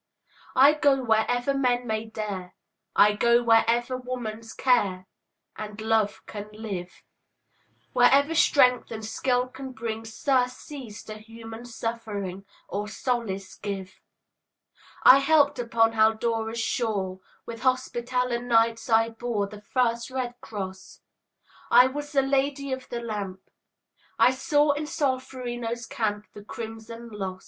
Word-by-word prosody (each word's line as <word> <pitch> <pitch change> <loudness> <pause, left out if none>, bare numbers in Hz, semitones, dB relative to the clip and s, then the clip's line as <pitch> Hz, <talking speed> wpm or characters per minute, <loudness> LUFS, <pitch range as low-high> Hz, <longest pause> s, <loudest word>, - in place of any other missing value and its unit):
I 280 +3 +7
go 280 -3 +2
wherever 245 +3 +2
men 250 -2 +1
may 220 -1 -2
dare, 205 -5 -6 0.4
I 210 0 +6
go 235 +3 +3
wherever 235 +2 +3
woman's 235 -3 -5
care 200 -9 +1 0.5
And 210 0 -7
love 220 -1 0
can 210 0 -7
live, 195 -5 -7 0.9
Wherever 275 +5 +5
strength 250 -6 +4
and 220 -1 -6
skill 250 +3 0
can 260 +1 -9
bring 225 -1 -4
Surcease 250 -1 -2
to 215 0 -8
human 225 +1 -10
suffering, 215 -5 -5 0.2
Or 205 +1 -3
solace 215 -5 -3
give. 195 -2 -6 1.0
I 270 - +9
helped 285 -2 +3
upon 230 -1 +2
Haldora's 225 +1 +1
shore; 210 -5 -1 0.3
With 230 -1 -8
Hospitaller 250 -1 0
Knights 230 -1 +2
I 225 0 +4
bore 225 -2 -2
The 205 +1 -11
first 235 +1 0
red 255 -2 -3
cross; 190 -2 -7 0.7
I 250 - +8
was 290 +3 -4
the 275 -2 +3
Lady 275 0 0
of 260 0 -7
the 240 -1 -4
Lamp; 200 -5 -6 0.7
I - - +6
saw 290 +3 +2
in 295 +1 -3
Solferino's 255 -5 -3
camp 210 -2 -2
The 205 - -11
crimson 225 +2 -8
loss. 190 -3 -5
230 Hz, 125 wpm, -26 LUFS, 215-255 Hz, 1.0 s, I